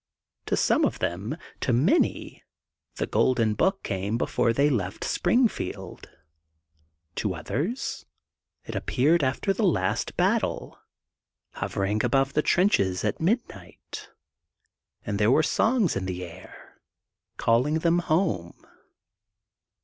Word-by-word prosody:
To - - +1
some - - +3
of - - +1
them, 100 - -3 0.2
to - - 0
many, 145 - +1 0.5
The - - -1
Golden 115 -4 +2
Book 190 - +1
came 100 +3 -2
before 115 - +1
they 140 +5 +3
left 100 -9 -2
Springfield. 235 - -1 1.1
To 100 -4 -1
others 170 - -3 0.6
it - - -7
appeared 150 +5 +2
after 135 +9 0
the 225 - -3
last 110 - 0
battle, - - 0 0.7
hovering 100 +2 -2
above 135 0 +2
the 150 - +2
trenches 105 - +2
at 105 - -2
midnight 220 +9 -3 1.0
and 100 -1 -2
there 105 +1 +4
were 155 +5 +4
songs 220 - +2
in 95 -1 -2
the 90 -1 -4
air 85 +2 -14 0.6
calling 125 +7 +2
them 170 +1 +2
home. 155 - 0
130 Hz, 115 wpm, -26 LUFS, -, 1.1 s, there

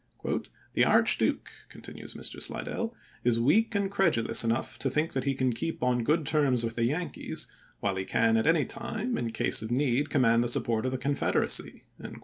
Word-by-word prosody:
" - - -26
The - - +3
Archduke," - - +3 0.2
continues - - -8
Mr. - - -2
Slidell, 230 0 -2 0.3
"is 120 -1 +3
weak 210 - +2
and 200 -1 0
credulous 170 - +2
enough 115 +2 -2
to 135 - 0
think 150 +5 -1
that 130 0 -2
he 135 -1 0
can 130 -2 0
keep 165 +7 -4
on 125 -1 +1
good 155 +5 +1
terms 135 -5 +2
with 115 0 -2
the 115 - +1
Yankees, 160 +8 -3 0.3
while 100 -1 0
he 95 - -1
can 115 +3 +2
at 110 +6 +1
any 160 -2 +3
time 235 +1 -4
in 115 - -2
case 115 - +1
of 110 - -5
need 130 +2 +1
command 115 -4 +3
the - - -1
support 115 0 0
of - - -1
the 130 - -2
Confederacy." 140 +2 -1
130 Hz, 190 wpm, -28 LUFS, 115-160 Hz, 0.3 s, The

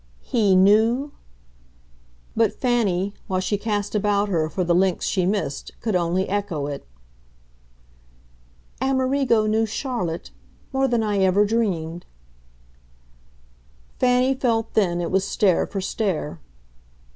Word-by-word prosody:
"'He' 210 -6 +2
knew 220 +9 +4 0.6
?" - - -33
But 225 -2 +2
Fanny, 205 -6 +1
while 185 -1 0
she 190 +3 -1
cast 205 -1 -2
about 205 -1 +1
her 160 -4 0
for 185 +2 -2
the 175 0 +1
links 185 0 +1
she 185 -3 0
missed, 195 -8 -3
could 220 -4 -2
only 180 +2 +1
echo 195 -7 -2
it. 140 - -6 1.9
"Amerigo 260 -3 +2
knew 220 +1 +1
Charlotte 220 - -4 0.4
more 270 0 +2
than 235 -3 +1
I 205 -2 0
ever 190 +2 +4
dreamed." 175 -7 -2 1.9
Fanny 250 +1 +3
felt 235 -4 -1
then 175 -5 +1
it 170 - -3
was 190 0 +2
stare 195 -2 +1
for 195 - -4
stare. 185 - -2
200 Hz, 120 wpm, -23 LUFS, 175-225 Hz, 1.9 s, knew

